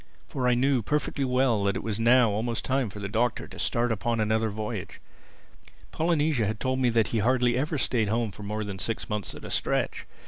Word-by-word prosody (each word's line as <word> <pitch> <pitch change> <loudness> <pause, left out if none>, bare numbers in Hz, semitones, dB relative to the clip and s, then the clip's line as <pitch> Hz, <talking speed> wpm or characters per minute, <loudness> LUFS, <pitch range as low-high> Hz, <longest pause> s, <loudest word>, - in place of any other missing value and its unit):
For 130 -2 -2
I 125 - +4
knew 130 0 +2
perfectly 150 +3 -1
well 125 -4 +2
that 100 - +1
it - - -4
was 110 -1 -3
now 120 0 +5
almost 115 +3 -2
time 130 -3 0
for 105 - -9
the 100 - -4
Doctor 115 +3 0
to - - -12
start 120 0 +1
upon 115 +2 -1
another 110 +1 +1
voyage. 105 -1 -5 0.9
Polynesia 155 -8 +1
had 110 0 -3
told 130 0 -1
me 125 -2 +3
that 115 -2 +2
he 115 - 0
hardly 120 +2 +2
ever 150 +4 -1
stayed 115 -5 +1
at - - -2
home 115 -1 0
for 105 - -11
more 105 +1 -3
than 100 -2 -6
six 115 +2 -2
months 105 -2 -3
at - - -10
a - - -6
stretch. - - -1
115 Hz, 220 wpm, -27 LUFS, 105-130 Hz, 0.9 s, now